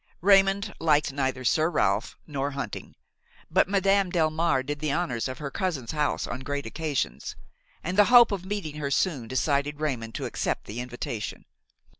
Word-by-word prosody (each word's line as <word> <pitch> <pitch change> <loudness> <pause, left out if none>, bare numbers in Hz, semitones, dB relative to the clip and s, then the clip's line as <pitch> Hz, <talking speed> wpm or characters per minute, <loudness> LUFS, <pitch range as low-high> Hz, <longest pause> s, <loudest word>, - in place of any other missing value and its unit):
Raymon 195 +1 +5 0.2
liked 150 -3 +2
neither 130 -2 -2
Sir 155 +6 +3
Ralph 170 - 0
nor 140 -2 -2
hunting, 140 - -6 0.6
but - - +3
Madame 195 -1 +2
Delmare 160 -4 +1
did 145 +1 -3
the 155 -1 -1
honors 140 -7 -1
of 130 - -6
her 140 -2 -5
cousin's 155 - -2
house 150 -1 0
on - - -5
great 140 +2 -4
occasions, 145 - -3 0.5
and 185 +4 -1
the 205 - +8
hope 240 -1 +7
of 195 -3 -2
meeting 190 -6 -4
her 145 -2 -2
soon 140 -5 0
decided 140 +3 0
Raymon 125 -7 -2
to - - -4
accept - - -2
the 110 +3 -6
invitation. 120 -3 -5
150 Hz, 165 wpm, -27 LUFS, 135-180 Hz, 0.6 s, the